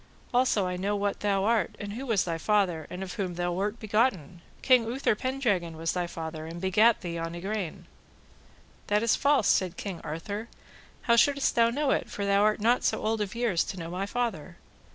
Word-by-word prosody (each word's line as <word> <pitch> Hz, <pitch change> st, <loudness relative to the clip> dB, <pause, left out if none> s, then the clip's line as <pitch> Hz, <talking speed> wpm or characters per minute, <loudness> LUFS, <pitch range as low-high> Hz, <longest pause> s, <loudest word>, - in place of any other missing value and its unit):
Also 245 Hz, -5 st, +3 dB
I 180 Hz, 0 st, -2 dB
know 200 Hz, +3 st, -1 dB
what 200 Hz, 0 st, -1 dB
thou 200 Hz, -2 st, +1 dB
art, 225 Hz, +1 st, +1 dB
and 205 Hz, -1 st, -5 dB
who 265 Hz, +5 st, -6 dB
was 220 Hz, -5 st, +2 dB
thy 165 Hz, -2 st, -3 dB
father, 180 Hz, -5 st, +1 dB
and 180 Hz, +2 st, -5 dB
of 185 Hz, -, -6 dB
whom 185 Hz, -3 st, -3 dB
thou 175 Hz, 0 st, -1 dB
wert 205 Hz, +6 st, -2 dB
begotten; 210 Hz, -, 0 dB, 0.2 s
King 255 Hz, -3 st, +5 dB
Uther 245 Hz, +2 st, 0 dB
Pendragon 210 Hz, -9 st, -1 dB
was 165 Hz, 0 st, -1 dB
thy 180 Hz, -1 st, -1 dB
father, 160 Hz, -1 st, -6 dB
and 165 Hz, +1 st, -7 dB
begat 210 Hz, +5 st, +3 dB
thee 170 Hz, -3 st, -4 dB
on 165 Hz, +1 st, -4 dB
Igraine. 190 Hz, -1 st, -4 dB, 1.0 s
That 210 Hz, +2 st, +2 dB
is 230 Hz, -, +3 dB
false, 280 Hz, -6 st, +3 dB
said 185 Hz, -2 st, +2 dB
King 195 Hz, -4 st, -5 dB
Arthur, 200 Hz, +8 st, -5 dB, 0.6 s
how 235 Hz, -, +4 dB
shouldest 280 Hz, +3 st, +3 dB
thou 230 Hz, 0 st, +4 dB
know 280 Hz, +3 st, 0 dB
it, -, -, 0 dB
for 200 Hz, -, -4 dB
thou 200 Hz, 0 st, +3 dB
art 215 Hz, +1 st, +3 dB
not 235 Hz, +4 st, +2 dB
so -, -, +1 dB
old 220 Hz, 0 st, 0 dB
of 210 Hz, +1 st, -3 dB
years 230 Hz, -8 st, +1 dB
to 190 Hz, -, -6 dB
know 165 Hz, -1 st, -6 dB
my 190 Hz, +2 st, -3 dB
father? 200 Hz, -8 st, -3 dB
200 Hz, 205 wpm, -28 LUFS, 175-230 Hz, 1.0 s, King